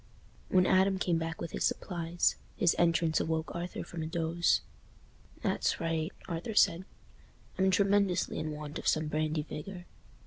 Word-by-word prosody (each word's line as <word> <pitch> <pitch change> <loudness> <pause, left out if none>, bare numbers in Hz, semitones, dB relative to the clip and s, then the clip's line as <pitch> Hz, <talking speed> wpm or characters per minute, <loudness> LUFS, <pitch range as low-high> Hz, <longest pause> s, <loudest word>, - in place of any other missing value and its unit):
When 185 -1 +4
Adam 190 +1 +4
came 175 -3 +1
back 165 0 -4
with 170 - -5
his - - -2
supplies, 175 -2 0 0.2
his 175 - +3
entrance 165 -1 +3
awoke 160 0 -2
Arthur 175 +1 -4
from 170 - -7
a 155 - -3
doze. 165 +1 +1 0.8
"That's - - 0
right," 165 +1 -1 0.2
Arthur 175 +5 -4
said; 180 -2 +4 0.7
"I'm 190 0 +4
tremendously 195 -1 +2
in 155 - -3
want 150 0 -6
of - - -5
some 155 0 +2
brandy 155 0 0
vigour." 175 +4 -7
170 Hz, 150 wpm, -31 LUFS, 160-185 Hz, 0.8 s, When